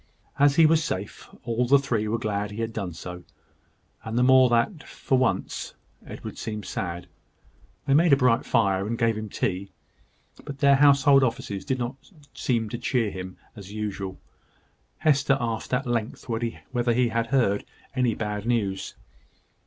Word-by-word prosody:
As 145 Hz, 0 st, +5 dB
he 165 Hz, -, +6 dB
was 160 Hz, 0 st, +4 dB
safe, 100 Hz, -, -5 dB
all 120 Hz, +1 st, 0 dB
the 140 Hz, +3 st, +6 dB
three 115 Hz, -6 st, -1 dB
were 110 Hz, +2 st, 0 dB
glad 105 Hz, -2 st, -2 dB
he 105 Hz, +2 st, -6 dB
had 115 Hz, 0 st, -3 dB
done 100 Hz, -5 st, -4 dB
so; 90 Hz, +2 st, -8 dB, 0.8 s
and 110 Hz, +1 st, -4 dB
the 125 Hz, -, +4 dB
more 130 Hz, 0 st, +6 dB
that, 120 Hz, -, +1 dB
for 130 Hz, -, -1 dB
once, 130 Hz, -2 st, -1 dB, 0.3 s
Edward -, -, -8 dB
seemed 105 Hz, -1 st, -5 dB
sad. 90 Hz, -7 st, -4 dB, 0.8 s
They 135 Hz, -, +2 dB
made 165 Hz, +3 st, +5 dB
a -, -, +8 dB
bright 125 Hz, -3 st, +3 dB
fire, 100 Hz, -3 st, +1 dB
and 115 Hz, +1 st, -2 dB
gave 115 Hz, -1 st, +2 dB
him 110 Hz, 0 st, -5 dB
tea; 95 Hz, 0 st, -2 dB, 0.7 s
but 140 Hz, -, -7 dB
their 140 Hz, 0 st, +5 dB
household 140 Hz, -1 st, +6 dB
offices 110 Hz, -5 st, -2 dB
did 130 Hz, -2 st, -1 dB
not 125 Hz, +2 st, -4 dB, 0.4 s
seem 115 Hz, -3 st, -1 dB
to 120 Hz, -, -5 dB
cheer 120 Hz, -4 st, 0 dB
him 95 Hz, -1 st, -7 dB, 0.2 s
as 100 Hz, -1 st, -10 dB
usual. 100 Hz, -3 st, -4 dB, 0.8 s
Hester 140 Hz, -2 st, +3 dB
asked, 115 Hz, -3 st, -3 dB
at 125 Hz, +2 st, 0 dB
length, 120 Hz, -2 st, -3 dB
whether 120 Hz, +1 st, -2 dB
he 125 Hz, 0 st, +2 dB
had 115 Hz, 0 st, -1 dB
heard 115 Hz, -6 st, +1 dB, 0.3 s
any 125 Hz, -4 st, +1 dB
bad 105 Hz, 0 st, -4 dB
news. 100 Hz, -5 st, -1 dB
115 Hz, 165 wpm, -25 LUFS, 105-130 Hz, 0.8 s, a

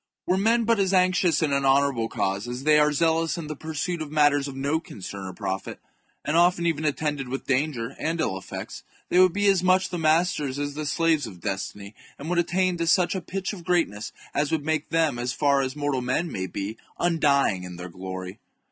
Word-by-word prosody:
Were 180 Hz, -, +2 dB
men 225 Hz, +4 st, +3 dB
but 230 Hz, -1 st, +2 dB
as 195 Hz, -1 st, +2 dB
anxious 180 Hz, -3 st, +3 dB
in 145 Hz, -3 st, +1 dB
an 140 Hz, 0 st, +1 dB
honourable 135 Hz, -4 st, +2 dB
cause 100 Hz, +4 st, -2 dB
as 125 Hz, +2 st, -5 dB
they 150 Hz, 0 st, +5 dB
are 150 Hz, 0 st, +4 dB
zealous 165 Hz, +3 st, +1 dB
in 170 Hz, -, -5 dB
the 155 Hz, 0 st, -5 dB
pursuit 160 Hz, +3 st, -3 dB
of 150 Hz, -2 st, -6 dB
matters 145 Hz, -2 st, +3 dB
of 135 Hz, -, -7 dB
no 140 Hz, +4 st, 0 dB
concern 100 Hz, -, -8 dB
or 95 Hz, -, -7 dB
profit, 95 Hz, +1 st, -4 dB, 0.5 s
and 150 Hz, -, 0 dB
often 170 Hz, 0 st, +4 dB
even 160 Hz, -2 st, 0 dB
attended 145 Hz, -2 st, -1 dB
with 135 Hz, +2 st, -5 dB
danger 135 Hz, -2 st, -1 dB
[and 160 Hz, +2 st, -1 dB
ill 125 Hz, -11 st, 0 dB
effects], 95 Hz, -, -7 dB, 0.3 s
they 180 Hz, -, +3 dB
would 185 Hz, -1 st, +6 dB
be 205 Hz, +3 st, -1 dB
as 195 Hz, -3 st, +4 dB
much 185 Hz, +1 st, +3 dB
the 175 Hz, -, -4 dB
masters 155 Hz, -4 st, +1 dB
as 145 Hz, 0 st, -3 dB
the 150 Hz, +1 st, -4 dB
slaves 160 Hz, -4 st, +1 dB
of 95 Hz, -5 st, -11 dB
destiny, 100 Hz, 0 st, -4 dB, 0.2 s
and 155 Hz, +5 st, -5 dB
would 175 Hz, -, +2 dB
attain 180 Hz, +1 st, +1 dB
to 170 Hz, 0 st, -1 dB
such 180 Hz, +1 st, +3 dB
a 190 Hz, -, -3 dB
pitch 190 Hz, +3 st, -4 dB
of 200 Hz, -, -7 dB
THE -, -, -13 dB
JUGURTHINE -, -, -18 dB
WAR. 180 Hz, -, +3 dB
I23 175 Hz, -, +5 dB, 0.2 s
greatness -, -, -5 dB, 0.2 s
as 145 Hz, 0 st, 0 dB
would 155 Hz, -3 st, -1 dB
make 155 Hz, -1 st, -1 dB
them, 160 Hz, -6 st, +1 dB
as 125 Hz, 0 st, -2 dB
far 140 Hz, -1 st, +2 dB
as 130 Hz, 0 st, -3 dB
mortal 145 Hz, -3 st, -1 dB
men 130 Hz, +7 st, 0 dB
chap. 165 Hz, -, -7 dB
may 95 Hz, 0 st, -3 dB
be, 100 Hz, +4 st, -5 dB, 0.2 s
undying 140 Hz, -, +2 dB
in 90 Hz, -1 st, -8 dB
their 90 Hz, +1 st, -7 dB
glory. 95 Hz, +2 st, -7 dB
150 Hz, 235 wpm, -25 LUFS, 130-170 Hz, 0.5 s, would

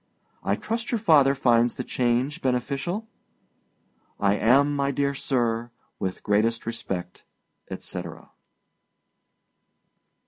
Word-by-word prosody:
I -, -, +1 dB
trust 230 Hz, +4 st, -3 dB
your 235 Hz, -, +2 dB
father 150 Hz, -9 st, +5 dB
finds 120 Hz, -3 st, +3 dB
the 125 Hz, -, -4 dB
change 125 Hz, +8 st, 0 dB
beneficial? 140 Hz, -, -1 dB, 1.1 s
I 100 Hz, 0 st, +3 dB
am, 135 Hz, +7 st, +3 dB
my 140 Hz, -1 st, +1 dB
dear 140 Hz, 0 st, 0 dB
sir, 120 Hz, -4 st, -1 dB, 0.3 s
with 95 Hz, -1 st, -4 dB
great 110 Hz, +3 st, +1 dB
respect, 95 Hz, -6 st, -5 dB, 0.5 s
etc. -, -, -6 dB
II. -, -, -22 dB
125 Hz, 105 wpm, -25 LUFS, 115-140 Hz, 1.1 s, father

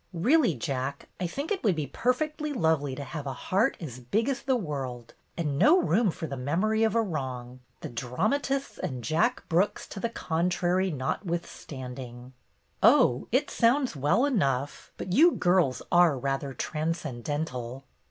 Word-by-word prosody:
"Really, 245 Hz, -, +3 dB
Jack, 140 Hz, -2 st, -4 dB
I 180 Hz, -, -1 dB
think 280 Hz, -, -5 dB
it 390 Hz, -, -1 dB
would 200 Hz, -6 st, +3 dB
be 155 Hz, -2 st, -2 dB
per 240 Hz, -, +1 dB
fectly 300 Hz, +2 st, -3 dB
lovely 155 Hz, -, +1 dB
to 140 Hz, -, -5 dB
have 145 Hz, -1 st, -6 dB
a 135 Hz, -, -2 dB
heart 195 Hz, -, +1 dB
as 130 Hz, -7 st, -7 dB
big 215 Hz, -, 0 dB
as 275 Hz, -1 st, -2 dB
the 265 Hz, -1 st, +1 dB
world 135 Hz, -, -4 dB, 0.2 s
and 150 Hz, -4 st, -1 dB
no 350 Hz, +5 st, +6 dB
room 215 Hz, -, +2 dB
for 165 Hz, 0 st, -4 dB
the 140 Hz, -3 st, -5 dB
memory 180 Hz, +12 st, 0 dB
of 225 Hz, -1 st, +2 dB
a 230 Hz, -, +4 dB
wrong, 130 Hz, -, -5 dB, 0.2 s
the -, -, -4 dB
dramatists 215 Hz, -, -1 dB
and 125 Hz, -3 st, -4 dB
Jack 155 Hz, +8 st, +1 dB
Brooks 180 Hz, +5 st, +1 dB
to 200 Hz, -, -7 dB
the 235 Hz, -, -1 dB
con 170 Hz, -5 st, -1 dB
trary 180 Hz, +1 st, +1 dB
notwithstanding." 130 Hz, -, -5 dB, 0.5 s
"Oh, 125 Hz, -, +5 dB
it 265 Hz, +5 st, +1 dB
sounds 250 Hz, -, +2 dB
well 150 Hz, -, +2 dB
enough. 140 Hz, -, -1 dB
But 180 Hz, -, -4 dB
you 330 Hz, -, +6 dB
girls 175 Hz, -8 st, +2 dB
are 175 Hz, -5 st, +5 dB
rather 135 Hz, +1 st, -2 dB
transcendental." 145 Hz, -4 st, -3 dB
165 Hz, 160 wpm, -28 LUFS, 135-220 Hz, 0.5 s, no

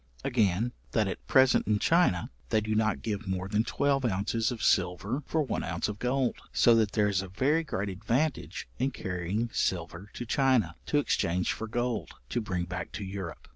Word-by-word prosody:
Again, 110 Hz, 0 st, +1 dB, 0.2 s
that 110 Hz, -3 st, +2 dB
at 95 Hz, -, -6 dB
present 130 Hz, -1 st, +4 dB
in 105 Hz, -1 st, +3 dB
China, 130 Hz, -, +2 dB, 0.2 s
they -, -, +3 dB
do 110 Hz, 0 st, -2 dB
not 110 Hz, -1 st, +1 dB
give 110 Hz, -1 st, -3 dB
more 95 Hz, 0 st, -2 dB
than 105 Hz, +2 st, +1 dB
twelve 140 Hz, +2 st, +1 dB
ounces 110 Hz, +1 st, 0 dB
of 115 Hz, -3 st, -5 dB
silver 100 Hz, -, +1 dB
for 160 Hz, -1 st, +1 dB
one 135 Hz, -, -2 dB
ounce -, -, -2 dB
of 105 Hz, -1 st, -5 dB
gold, 125 Hz, 0 st, 0 dB
so 120 Hz, -, +5 dB
that 110 Hz, -3 st, +2 dB
there 105 Hz, -1 st, +3 dB
is 100 Hz, -2 st, +1 dB
a 95 Hz, -, -6 dB
very 140 Hz, -, +1 dB
great 105 Hz, -9 st, -3 dB
advantage 120 Hz, -, -1 dB
in 130 Hz, +2 st, +2 dB
carrying 95 Hz, +1 st, -3 dB
silver 85 Hz, +2 st, -2 dB
to 120 Hz, -, -5 dB
China, 120 Hz, -, +2 dB
to 150 Hz, -, +2 dB
exchange 90 Hz, -10 st, +1 dB
for 110 Hz, -, -5 dB
gold, 120 Hz, 0 st, -2 dB
to 120 Hz, -, -1 dB
bring 90 Hz, -5 st, -2 dB
back 90 Hz, +1 st, -5 dB
to 105 Hz, -, -4 dB
Europe. 95 Hz, -3 st, -6 dB
110 Hz, 190 wpm, -29 LUFS, 95-125 Hz, 0.2 s, so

